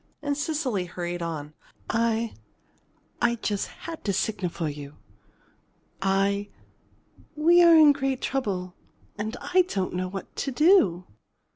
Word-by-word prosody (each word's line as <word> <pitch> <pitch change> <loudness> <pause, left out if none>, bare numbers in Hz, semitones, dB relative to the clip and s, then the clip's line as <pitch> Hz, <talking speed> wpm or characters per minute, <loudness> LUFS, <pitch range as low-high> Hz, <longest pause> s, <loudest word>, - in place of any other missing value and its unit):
And 285 -1 0
Cecily 290 - -1
hurried 175 0 -5
on: 155 -3 -5 0.3
"I 230 0 0 0.9
I 235 0 +3
just 210 -3 -2
had 330 -1 -9
to 200 - +1
signal 190 -2 -1
for 165 -1 -3
you. 145 0 -7 1.1
I 195 +1 +1 0.9
we 340 +4 +5
are 340 -1 +8
in 310 -2 +8
great 270 -2 -1
trouble 195 -9 -2 0.5
and 220 +3 -3
I 370 +1 +3
don't 190 - -2
know 180 +1 -2
what 195 +1 -8
to - - -2
do." 250 - +4
210 Hz, 130 wpm, -26 LUFS, 180-285 Hz, 1.1 s, are